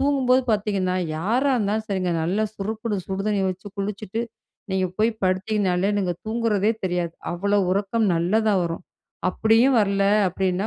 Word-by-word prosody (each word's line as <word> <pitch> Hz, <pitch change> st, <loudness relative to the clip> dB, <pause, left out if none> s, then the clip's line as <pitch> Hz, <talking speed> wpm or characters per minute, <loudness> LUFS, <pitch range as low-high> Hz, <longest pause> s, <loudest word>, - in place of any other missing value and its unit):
தூங்கும் 275 Hz, -2 st, +1 dB
போது 255 Hz, +1 st, +5 dB
பார்த்தீங்கன்னா, 200 Hz, -3 st, 0 dB, 0.2 s
யாரா 235 Hz, -, +1 dB
இருந்தாலும் 215 Hz, 0 st, -1 dB
சரிங்க, 185 Hz, -3 st, -1 dB
நல்லா 195 Hz, +6 st, 0 dB
சுறுக்குன்னு 215 Hz, +1 st, -3 dB
சுடு 190 Hz, 0 st, -3 dB
தண்ணி 205 Hz, -2 st, +1 dB
வச்சு 185 Hz, +2 st, -6 dB
குளிச்சுட்டு 210 Hz, +2 st, -3 dB, 0.5 s
நீங்க 190 Hz, -1 st, +1 dB
போய் 225 Hz, +2 st, +3 dB
படுத்தீங்கன்னாலே 190 Hz, 0 st, +1 dB
நீங்க 180 Hz, -3 st, 0 dB
தூங்குறதே 220 Hz, -2 st, +1 dB
தெரியாது. 175 Hz, -2 st, -1 dB, 0.2 s
அவ்வளவு 200 Hz, +1 st, +1 dB
உறக்கம் 210 Hz, +3 st, 0 dB
நல்லதா 210 Hz, +6 st, +2 dB
வரும். 165 Hz, +1 st, -4 dB, 0.5 s
அப்டியும் 225 Hz, +6 st, +3 dB
வரல 200 Hz, -1 st, +1 dB, 0.2 s
அப்டின்னா 185 Hz, +2 st, -1 dB
200 Hz, 140 wpm, -23 LUFS, 185-220 Hz, 0.5 s, போது